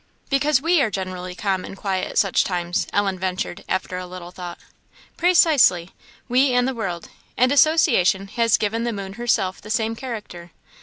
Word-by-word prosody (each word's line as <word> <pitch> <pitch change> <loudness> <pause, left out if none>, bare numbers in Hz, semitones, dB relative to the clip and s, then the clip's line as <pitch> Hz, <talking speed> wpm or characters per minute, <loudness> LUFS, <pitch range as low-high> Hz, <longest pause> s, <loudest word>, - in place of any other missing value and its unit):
"Because 275 0 +2
we 335 -1 +3
are 235 - +2
generally 185 -2 -5
calm 190 -1 -1
and 195 - -9
quiet 190 -2 -2
at - - -7
such 195 -3 +3
times?" 175 -1 -2
Ellen 195 -2 0
ventured, 185 +1 -3
after 185 -1 -2
a 180 - -7
little 180 -1 -9
thought. 180 -1 -8 0.6
"Precisely! 300 - +4 0.4
we 255 +1 +3
and 245 0 +2
the 265 - -1
world. 185 -8 -5 0.3
And 255 +1 +3
association 235 - +3
has 230 0 +2
given 225 +2 -1
the 235 -1 -1
moon 195 -1 -6
herself 210 -5 -1
the 210 - -12
same 225 +1 0
character. 215 -9 -7
200 Hz, 170 wpm, -22 LUFS, 185-245 Hz, 0.6 s, Precisely